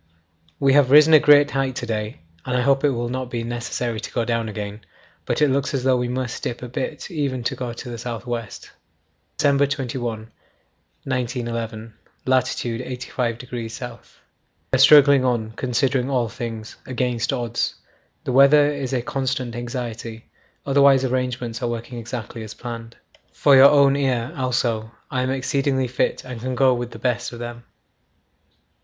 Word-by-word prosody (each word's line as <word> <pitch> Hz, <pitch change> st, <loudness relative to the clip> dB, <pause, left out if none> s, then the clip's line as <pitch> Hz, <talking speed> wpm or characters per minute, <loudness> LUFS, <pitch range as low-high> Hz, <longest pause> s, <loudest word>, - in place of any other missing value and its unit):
We 135 Hz, -1 st, +4 dB
have 140 Hz, -2 st, +5 dB
risen 150 Hz, +3 st, +7 dB
a 155 Hz, -, +9 dB
great 145 Hz, 0 st, +6 dB
height 135 Hz, -2 st, -1 dB
to 125 Hz, -, -4 dB
day 110 Hz, -2 st, -4 dB, 0.2 s
and 125 Hz, -1 st, -1 dB
I -, -, +2 dB
hope 135 Hz, +1 st, +2 dB
it 145 Hz, -, +4 dB
will 120 Hz, -2 st, -2 dB
not 130 Hz, 0 st, -4 dB
be 120 Hz, -2 st, -3 dB
necessary 120 Hz, -1 st, -3 dB
to -, -, -7 dB
go 120 Hz, -2 st, -1 dB
down 115 Hz, -1 st, -1 dB
again, 105 Hz, 0 st, -6 dB, 0.5 s
but -, -, +1 dB
it -, -, +5 dB
looks 140 Hz, +2 st, 0 dB
as 130 Hz, -, -1 dB
though 130 Hz, -1 st, +3 dB
we 125 Hz, 0 st, -1 dB
must 125 Hz, 0 st, -3 dB
dip 120 Hz, +1 st, -4 dB
a -, -, -5 dB
bit 125 Hz, -, -5 dB
even 140 Hz, -6 st, -2 dB
to -, -, -1 dB
go 125 Hz, -2 st, -4 dB
to 115 Hz, -, -8 dB
the 120 Hz, -1 st, -6 dB
south 115 Hz, -1 st, -5 dB
west. 115 Hz, -4 st, -6 dB, 0.7 s
'December 140 Hz, 0 st, +3 dB
21, 120 Hz, -5 st, -4 dB, 0.7 s
1911. 115 Hz, -3 st, -3 dB, 0.3 s
Lat. 130 Hz, -1 st, +3 dB
85° 125 Hz, -1 st, -3 dB, 0.4 s
S. -, -, -19 dB, 0.9 s
We -, -, +6 dB
are -, -, +1 dB
struggling 140 Hz, -1 st, +7 dB
on, 120 Hz, -4 st, 0 dB
considering 130 Hz, +2 st, 0 dB
all 125 Hz, -4 st, 0 dB
things, 115 Hz, -1 st, -7 dB
against 125 Hz, -1 st, -1 dB
odds. 120 Hz, -3 st, -2 dB, 0.5 s
The -, -, -3 dB
weather 145 Hz, +3 st, +6 dB
is 140 Hz, -2 st, -4 dB
a 125 Hz, -2 st, 0 dB
constant 130 Hz, -2 st, -2 dB
anxiety, 120 Hz, -2 st, -6 dB, 0.4 s
otherwise 140 Hz, -1 st, +5 dB
arrangements 125 Hz, -2 st, -2 dB
are 120 Hz, -, -1 dB
working 120 Hz, +1 st, -5 dB
exactly 115 Hz, 0 st, -6 dB
as 110 Hz, -1 st, -8 dB
planned. 115 Hz, -1 st, -8 dB, 0.4 s
'For 140 Hz, -2 st, +4 dB
your 135 Hz, +1 st, +9 dB
own 140 Hz, -2 st, +5 dB
ear 130 Hz, -4 st, 0 dB
also, 120 Hz, -4 st, -1 dB, 0.2 s
I 130 Hz, -, 0 dB
am 130 Hz, -, -1 dB
exceedingly 135 Hz, 0 st, 0 dB
fit 125 Hz, -, -1 dB
and 125 Hz, -3 st, -8 dB
can 130 Hz, +1 st, -3 dB
go 130 Hz, +1 st, +4 dB
with 120 Hz, -1 st, -3 dB
the -, -, -10 dB
best 125 Hz, -5 st, -1 dB
of 120 Hz, -, -8 dB
them. 120 Hz, 0 st, -7 dB
125 Hz, 170 wpm, -22 LUFS, 120-135 Hz, 0.9 s, a